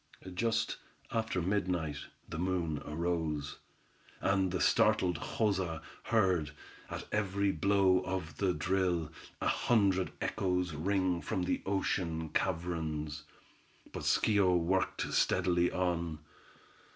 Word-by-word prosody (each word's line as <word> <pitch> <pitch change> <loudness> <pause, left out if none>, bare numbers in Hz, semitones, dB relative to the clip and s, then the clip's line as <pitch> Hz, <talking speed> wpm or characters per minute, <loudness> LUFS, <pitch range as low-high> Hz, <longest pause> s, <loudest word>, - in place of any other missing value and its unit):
Just 110 +3 0 0.3
after 110 -6 -1
midnight 90 -6 0 0.3
the 80 - -5
moon 85 -4 -1
arose, 80 -2 -2 0.6
and 95 -1 +2
the 90 - -1
startled 90 -4 +3
Joza 95 -7 0 0.3
heard, 95 -9 +2 0.4
at - - -5
every 100 -1 +1
blow 95 +1 +3
of 90 -5 -4
the 95 -2 +2
drill, 90 -3 0 0.3
a - - 0
hundred 100 -6 +2
echoes 90 -4 0
ring 95 +3 +1
out 85 - -9
from 90 - -1
the 90 - 0
ocean 85 -4 -1
caverns. 80 -4 -2 0.7
But - - -4
Schio 100 -4 +3
worked 95 +3 0
steadily 90 -1 +2
on. 85 -3 -1
90 Hz, 110 wpm, -32 LUFS, 80-95 Hz, 0.7 s, startled